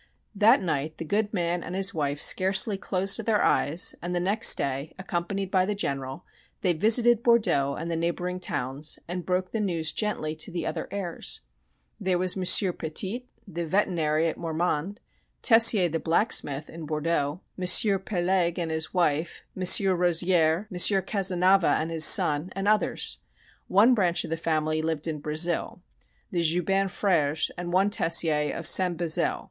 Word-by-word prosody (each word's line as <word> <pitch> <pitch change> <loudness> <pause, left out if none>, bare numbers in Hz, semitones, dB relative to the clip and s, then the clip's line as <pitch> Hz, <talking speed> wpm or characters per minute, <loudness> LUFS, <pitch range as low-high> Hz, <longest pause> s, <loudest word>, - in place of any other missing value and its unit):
That 215 +3 +3
night 155 -2 -4
the 165 - -7
good 205 +5 -2
man 175 -3 -2
and 180 - -7
his 195 0 +2
wife 145 -2 -3
scarcely 190 +5 +2
closed 195 +2 0
their 215 -1 0
eyes, 160 +5 +2
and 175 +1 -5
the - - 0
next 200 +5 +4
day, 140 +3 -5
accompanied 190 +1 -5
by 185 -2 +2
the 205 +2 -3
General, 135 -4 -5 0.4
they 180 - +1
visited 230 +6 +3
Bordeaux 215 - +1
and 165 +2 -6
the - - -2
neighboring 175 +2 -4
towns 140 -2 -3
and 175 0 -6
broke 185 0 -2
the 225 - -3
news 170 -6 0
gently 185 -8 -3
to 155 - -5
the 170 -3 -5
other - - -5
heirs. 190 -4 -3 0.6
There 185 -1 -1
was 185 0 -2
M. 190 - -4 0.3
Pettit, 190 +11 -4 0.2
the 170 -3 -6
veterinary 165 -4 0
at 160 - -5
Mormand; 170 +4 -3 0.4
Tessier, 225 -5 +6
the 165 0 -4
blacksmith 160 -5 0
in 160 -1 -10
Bordeaux; 155 +1 -3 0.2
M. 195 +2 +4
Pelegue 180 -2 -2
and 170 -2 -4
his 160 +3 -5
wife, 165 -2 -1
M. 185 - -8 0.3
Rozier, 175 +1 0
M. 180 - -7 0.3
Cazenava 190 -2 +2
and 160 +1 -4
his 160 -1 +3
son, 150 +4 +5
and 195 +1 -4
others. 215 0 0 0.5
One 215 +7 +4
branch 180 -7 0
of - - -9
the - - 0
family 155 -1 -2
lived 160 -1 -3
in 155 -2 -4
Brazil 160 +4 -2 0.5
the 175 - -1
Joubin 180 +4 0
Frères 160 -6 -1
and 175 0 -7
one 195 +3 +1
Tessier 165 -7 +1
of 165 - -7
"Saint 180 -1 +3
Bezeille." 165 -2 +1
175 Hz, 165 wpm, -25 LUFS, 160-195 Hz, 0.6 s, Tessier